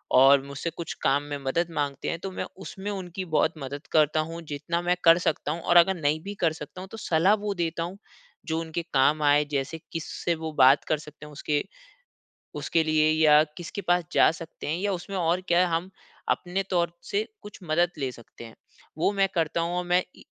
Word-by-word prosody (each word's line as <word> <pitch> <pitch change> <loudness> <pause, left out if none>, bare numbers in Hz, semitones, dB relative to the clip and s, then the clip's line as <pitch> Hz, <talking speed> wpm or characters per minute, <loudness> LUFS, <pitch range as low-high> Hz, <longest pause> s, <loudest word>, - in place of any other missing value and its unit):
और 135 +1 +7
मुझसे 140 +4 -4
कुछ 170 - -4
काम 140 +1 +2
में 145 0 -5
मदद 165 +6 +1
माँगते 145 -2 -2
हैं 165 - -3
तो 195 - -4
मैं - - -4 0.2
उसमें 195 +1 -6
उनकी 185 -1 -5
बहुत 160 +2 +3
मदद 140 +1 -7
करता 155 0 +3
हूँ 165 +1 -6
जितना 160 +4 -2
मैं 175 +1 +1
कर 165 0 +7
सकता 155 -4 -1
हूँ। 165 +2 -4
और 175 - +4
अगर 190 +3 +6
नहीं 150 +1 +1
भी 200 - -5
कर 160 - +2
सकता 160 +4 -9
हूँ 190 - -8
तो 225 - -8
सलाह 180 -1 +3
वो 205 - 0
देता 165 -2 -2
हूँ 180 +3 -6 0.5
जो 160 -1 0
उनके 165 +1 -3
काम 145 +3 +3
आए। 145 0 +4
जैसे 140 +3 -2
किससे 165 +1 -2
वो 160 0 -5
बात 135 +2 +7
कर 155 - +2
सकते 150 0 -12
हैं 150 - -11
उसके 145 +1 -1 0.9
उसके 165 - +1
लिए 155 -1 +3
या 155 -1 +6
किसके 175 +3 -6
पास 175 -1 +2
जा - - +6
सकते 165 0 -9
हैं 155 +3 -1
या 200 +1 0
उसमें 190 +2 -5
और 175 +1 +1
क्या 175 +1 +4
हम 165 +3 -1 0.4
अपने 180 +2 0
तौर 170 -2 +1 0.2
से 210 +2 0
कुछ 210 - -11
मदद 170 +1 +1
ले 135 -3 -2
सकते 120 -1 -14
हैं। 115 - -12 0.4
वो 165 - +2
मैं 195 -1 +3
करता 165 0 0
हूँ। 170 +1 -2
और 180 - -2
मैं 180 +1 +3
इ - - -15
165 Hz, 215 wpm, -26 LUFS, 150-175 Hz, 0.9 s, और